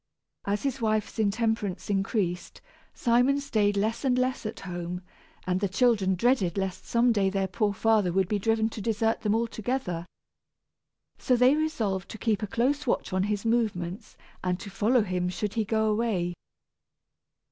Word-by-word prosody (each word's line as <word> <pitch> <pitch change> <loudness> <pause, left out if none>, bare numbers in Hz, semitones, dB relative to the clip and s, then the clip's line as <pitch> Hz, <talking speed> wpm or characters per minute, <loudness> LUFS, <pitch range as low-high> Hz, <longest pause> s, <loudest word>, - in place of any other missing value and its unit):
As 200 +1 -1
his 270 -2 -2
wife's 215 0 0
intemperance 215 -2 0
increased, 195 -3 -1 0.3
Simon 250 +3 +2
stayed 210 -7 +1
less 220 +5 0
and 255 -2 +2
less 255 -3 0
at 215 - -7
home, 180 -1 -5 0.4
and 185 0 0
the 200 -1 0
children 200 -3 +2
dreaded 200 -4 +1
lest 190 -2 -3
some 240 +1 +3
day 200 -4 +2
their 195 0 -1
poor 205 +3 0
father 210 -2 +2
would 190 +1 +1
be 210 +1 0
driven 225 +1 +2
to 220 - -7
desert 225 +1 0
them 210 0 +1
altogether. 225 -6 -2 1.1
So 255 - +2
they 250 +3 +5
resolved 220 -12 -1
to - - -7
keep 220 -1 0
a 210 - -2
close 275 +7 0
watch 230 - 0
on 185 - +2
his 210 0 -2
movements, 210 -6 -1 0.3
and 180 0 0
to 200 - -8
follow 225 +5 +2
him 180 -2 -1
should 195 +3 -3
he 225 - 0
go 220 +1 +1
away. 210 -6 0
215 Hz, 165 wpm, -27 LUFS, 190-235 Hz, 1.1 s, they